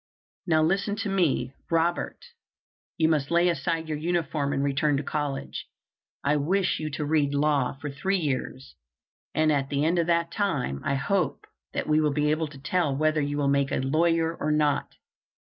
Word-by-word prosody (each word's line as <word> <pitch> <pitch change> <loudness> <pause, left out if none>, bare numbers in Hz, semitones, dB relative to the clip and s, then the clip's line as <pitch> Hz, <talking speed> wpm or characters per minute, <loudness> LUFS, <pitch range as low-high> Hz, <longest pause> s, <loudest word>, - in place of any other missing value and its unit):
Now 160 -2 +4
listen 195 +5 +1
to 210 -1 -3
me, 155 -9 +1 0.2
Robert: 170 - 0 0.7
you 160 - +3
must 150 -3 +1
lay 170 +1 +4
aside 165 0 -1
your 155 -1 -3
uniform, 155 -4 -1
and 140 -1 0
return 140 +1 +1
to 145 - -2
college. 145 -2 -3 0.6
I 150 +1 +2
wish 180 +6 +1
you 155 -1 -3
to 150 +1 -2
read 145 -2 +1
law 145 -3 +2
for 145 -1 -5
three 190 +8 0
years, 135 - -3 0.6
and 155 0 +3
at 135 -2 0
the 145 +1 0
end 170 +2 +2
of 165 - +1
that 170 0 +1
time 145 - -1
I 140 - 0
hope 160 +4 -1 0.3
that - - -2
we 155 0 +3
will 150 -2 +1
be 150 +1 +1
able 155 +1 0
to 145 -1 -12
tell 150 0 0
whether 155 +1 +2
you 145 0 -2
will 145 -1 +1
make 140 0 +2
a - - +1
lawyer 165 +4 +1
or 155 - -1
not." 150 -2 +1
155 Hz, 185 wpm, -26 LUFS, 140-170 Hz, 0.7 s, Now